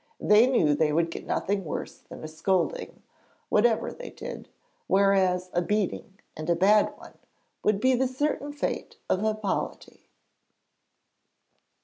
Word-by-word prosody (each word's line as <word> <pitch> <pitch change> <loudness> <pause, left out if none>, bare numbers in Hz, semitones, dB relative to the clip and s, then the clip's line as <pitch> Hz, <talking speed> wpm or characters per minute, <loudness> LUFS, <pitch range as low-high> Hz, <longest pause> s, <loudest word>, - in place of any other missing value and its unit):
They 210 +4 +5
knew 165 - +3
they 150 +1 +2
would 165 +2 +1
get - - -7
nothing 200 0 -1
worse 155 - -5
than - - -12
a - - -4
scolding, 190 - -2 0.5
whatever 225 +1 +2
they - - -9
did, - - -8 0.4
whereas 190 -2 +2
a 175 - +2
beating, 195 0 -2 0.2
and 155 +2 -6
a 170 - +4
bad 205 +4 +4
one, - - -15 0.4
would 210 -2 +2
be 260 +4 +3
the 260 +1 +2
certain 290 +2 -2
fate 290 - -4
of 185 - +1
Hippolyte. 215 -2 -3
200 Hz, 135 wpm, -27 LUFS, 175-230 Hz, 0.5 s, They